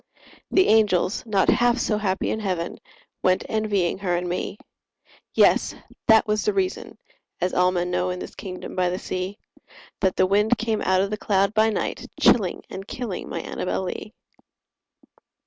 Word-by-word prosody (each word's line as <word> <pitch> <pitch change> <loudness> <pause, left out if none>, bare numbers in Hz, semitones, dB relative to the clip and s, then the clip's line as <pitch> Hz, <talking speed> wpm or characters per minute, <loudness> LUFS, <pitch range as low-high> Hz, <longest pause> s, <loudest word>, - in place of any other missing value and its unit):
The 375 - +4
angels, 210 -2 +3
not 200 -3 +2
half 240 0 +4
so 215 -3 0
happy 190 -3 -1
in 220 - -2
heaven, 185 -5 -3 0.4
Went 185 0 +2
envying 205 -5 0
her 180 -3 0
and 180 +1 -3
me— 180 +3 -3 0.8
Yes!—that 220 0 +3
was 215 -1 0
the 420 - +1
reason 385 -1 -2 0.4
(as 180 - -1
all 180 0 +3
men 180 0 -1
know, 180 0 0
In 180 - -3
this - - -8
kingdom 185 -2 -7
by 180 -1 +2
the 180 - -2
sea) 185 +2 -4 0.6
That 190 -1 +1
the 185 - +4
wind 210 +5 +2
came 220 -1 -1
out 185 0 +2
of 200 +1 -1
the 215 - -2
cloud 200 -1 +1
by 220 +1 +4
night, 215 - -3
Chilling 195 -7 +3
and 195 +1 -8
killing 230 -7 -5
my - - -3
Annabel 185 - -3
Lee. 190 +3 -5
195 Hz, 165 wpm, -24 LUFS, 185-220 Hz, 0.8 s, The